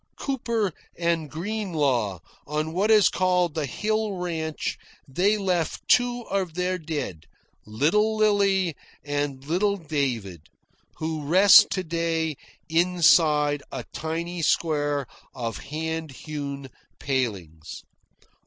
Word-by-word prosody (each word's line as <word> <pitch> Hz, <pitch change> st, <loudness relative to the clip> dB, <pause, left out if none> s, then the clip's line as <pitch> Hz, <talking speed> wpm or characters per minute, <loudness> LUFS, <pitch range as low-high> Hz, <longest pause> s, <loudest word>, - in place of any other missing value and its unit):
Cooper 230 Hz, -, -1 dB, 0.2 s
and 170 Hz, -3 st, 0 dB
Greenlaw 155 Hz, -, -1 dB, 0.3 s
on 155 Hz, +2 st, -2 dB
what 195 Hz, +5 st, +1 dB
is 215 Hz, -3 st, +6 dB
called 180 Hz, -2 st, +1 dB
the 155 Hz, -2 st, -2 dB
Hill 215 Hz, -, -1 dB
Ranch 165 Hz, -4 st, -3 dB, 0.3 s
they 190 Hz, +10 st, +2 dB
left 180 Hz, -5 st, -1 dB
two 245 Hz, 0 st, +3 dB
of 190 Hz, -6 st, -2 dB
their 180 Hz, 0 st, -1 dB
dead, 150 Hz, -, -5 dB, 0.4 s
"Little 170 Hz, -, +2 dB
Lillie" 200 Hz, -5 st, +2 dB, 0.3 s
and 145 Hz, -2 st, -3 dB
"Little 200 Hz, +6 st, +1 dB
David," 125 Hz, -, -3 dB, 0.5 s
who 160 Hz, -1 st, -3 dB
rest 185 Hz, +7 st, +7 dB
to 185 Hz, -, -2 dB
day 165 Hz, -2 st, -1 dB, 0.3 s
inside 160 Hz, -4 st, +3 dB
a 125 Hz, -, -5 dB
tiny 170 Hz, +2 st, -4 dB
square 145 Hz, -3 st, +1 dB, 0.3 s
of 115 Hz, -3 st, -4 dB
hand 160 Hz, +1 st, -4 dB
hewn 140 Hz, -1 st, -6 dB, 0.3 s
palings. 100 Hz, -, -3 dB
160 Hz, 105 wpm, -25 LUFS, 145-185 Hz, 0.5 s, rest